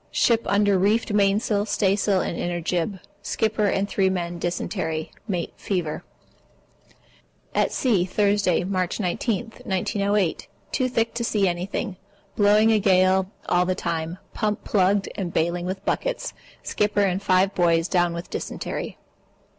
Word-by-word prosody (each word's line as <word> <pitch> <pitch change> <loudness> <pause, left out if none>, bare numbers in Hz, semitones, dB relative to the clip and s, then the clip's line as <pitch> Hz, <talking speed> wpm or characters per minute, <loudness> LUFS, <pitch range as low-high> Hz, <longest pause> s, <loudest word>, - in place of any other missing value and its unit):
Ship 230 -1 +3
under 200 0 +3
reefed 210 +3 +2
mainsail, 205 +1 +2
staysail, 195 -2 +2
and - - -3
inner 175 +1 -2
jib. 175 +3 -2 0.2
Skipper 220 -2 0
and 195 0 +1
3 195 -2 +1
men 175 -2 -3
dysentery. 165 -2 -3 0.2
Mate 180 -5 -2
fever. 175 -6 -2 1.5
At - - +2
sea, 210 -9 +2
Thursday, 200 -2 +2
March 185 0 -1
19, 220 +4 -1
1908. 200 -1 0 0.2
Too 255 -2 0
thick 230 -2 0
to 235 - -2
see 210 -4 +2
anything. 180 +3 -3 0.4
Blowing 210 +2 +5
a 220 - +4
gale 185 -1 +3 0.2
all 180 0 +2
the 185 - +1
time. 165 -1 -3 0.2
Pump 210 -2 -1
plugged 195 0 +2
up - - -12
and 180 -3 -3
bailing 175 +2 0
with 190 +1 -5
buckets. - - -2 0.3
Skipper 205 0 +1
and 190 0 0
five 190 0 +3
boys 170 -1 +2
down 175 -2 +1
on 170 - -4
dysentery. - - -5
190 Hz, 140 wpm, -24 LUFS, 175-205 Hz, 1.5 s, Blowing